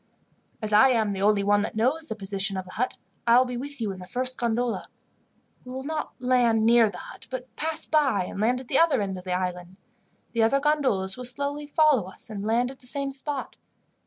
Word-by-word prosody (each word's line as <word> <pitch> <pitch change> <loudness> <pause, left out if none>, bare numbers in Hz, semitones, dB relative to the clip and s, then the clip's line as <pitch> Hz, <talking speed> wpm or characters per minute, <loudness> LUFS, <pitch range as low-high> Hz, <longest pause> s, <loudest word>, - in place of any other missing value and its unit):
"As 215 0 -1
I 215 +6 +7
am 220 -4 +1
the 195 -1 -4
only 205 0 +3
one 205 +1 +3
that - - -4
knows 270 +9 +1
the 220 - -4
position 195 -1 -1
of 185 - -4
the 185 - -12
hut, 250 +6 -2 0.3
I 235 +1 +6
will 255 - +5
be 250 -1 -5
with 280 +3 -6
you 215 -3 -2
in 190 - -8
the 180 - -10
first 255 +5 0
gondola. 240 0 -1 0.8
We 250 - -10
will 260 +1 -5
not 310 +2 -4
land 245 -3 +2
near 230 -1 +5
the 185 - -9
hut, - - -11
but 255 -1 -7
pass 320 0 -1
by, 275 -11 +2
and 195 - -6
land 245 +3 +2
at 255 - -11
the 265 - +2
other 330 -6 +4
end 195 -2 -3
of 180 - -14
the 180 - -2
island. 180 0 -5 0.5
The 230 - 0
other 230 +5 +3
gondolas 265 -11 +1
will 250 - -6
slowly 285 +3 -3
follow 290 - +3
us, 215 - -7
and 200 -2 -5
land 235 +4 +1
at 270 - -14
the 250 - -6
same 275 +1 0
spot. 275 0 +1
240 Hz, 230 wpm, -26 LUFS, 205-270 Hz, 0.8 s, I